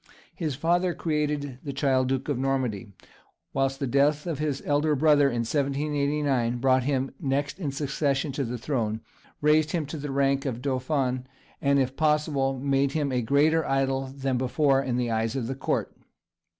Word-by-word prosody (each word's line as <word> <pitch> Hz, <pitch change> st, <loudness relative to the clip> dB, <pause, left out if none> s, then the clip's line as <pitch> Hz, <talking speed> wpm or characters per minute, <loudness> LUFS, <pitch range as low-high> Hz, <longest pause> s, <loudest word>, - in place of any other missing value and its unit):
His 155 Hz, -6 st, -3 dB
father 175 Hz, +4 st, +1 dB
created 150 Hz, -4 st, -2 dB
the 140 Hz, -, -4 dB
child 135 Hz, -2 st, +2 dB
Duke 135 Hz, 0 st, -1 dB
of 145 Hz, -4 st, -1 dB
Normandy, 130 Hz, -6 st, -1 dB, 0.6 s
whilst 135 Hz, 0 st, 0 dB
the 140 Hz, -, -1 dB
death 145 Hz, +3 st, +2 dB
of 165 Hz, -5 st, -3 dB
his 150 Hz, -3 st, -2 dB
elder 150 Hz, +1 st, +2 dB
brother 145 Hz, 0 st, +4 dB
in 120 Hz, -2 st, -1 dB
1789 140 Hz, -1 st, 0 dB
brought 130 Hz, 0 st, +2 dB
him 135 Hz, -1 st, 0 dB
next 140 Hz, +4 st, -1 dB
in 150 Hz, -7 st, -2 dB
succession 140 Hz, 0 st, -1 dB
to 140 Hz, +1 st, -2 dB
the 125 Hz, 0 st, -3 dB
throne, 115 Hz, -4 st, -2 dB, 0.4 s
raised 150 Hz, +2 st, +3 dB
him 165 Hz, -4 st, 0 dB
to 145 Hz, +3 st, -6 dB
the 145 Hz, 0 st, -5 dB
rank 135 Hz, 0 st, +1 dB
of 120 Hz, -3 st, -3 dB
dauphin, 130 Hz, -1 st, -1 dB, 0.3 s
and, 140 Hz, 0 st, +3 dB
if 130 Hz, -1 st, 0 dB
possible, 150 Hz, -3 st, +1 dB
made 135 Hz, +1 st, +1 dB
him 145 Hz, -3 st, 0 dB
a 125 Hz, -1 st, +1 dB
greater 150 Hz, +7 st, +3 dB
idol 135 Hz, 0 st, 0 dB
than 135 Hz, -1 st, -2 dB
before 135 Hz, +1 st, +2 dB
in 125 Hz, -3 st, -1 dB
the 120 Hz, -2 st, 0 dB
eyes 110 Hz, +1 st, 0 dB
of 130 Hz, -4 st, -2 dB
the 130 Hz, -, -3 dB
Court. 135 Hz, -, -2 dB
135 Hz, 175 wpm, -26 LUFS, 130-150 Hz, 0.6 s, brother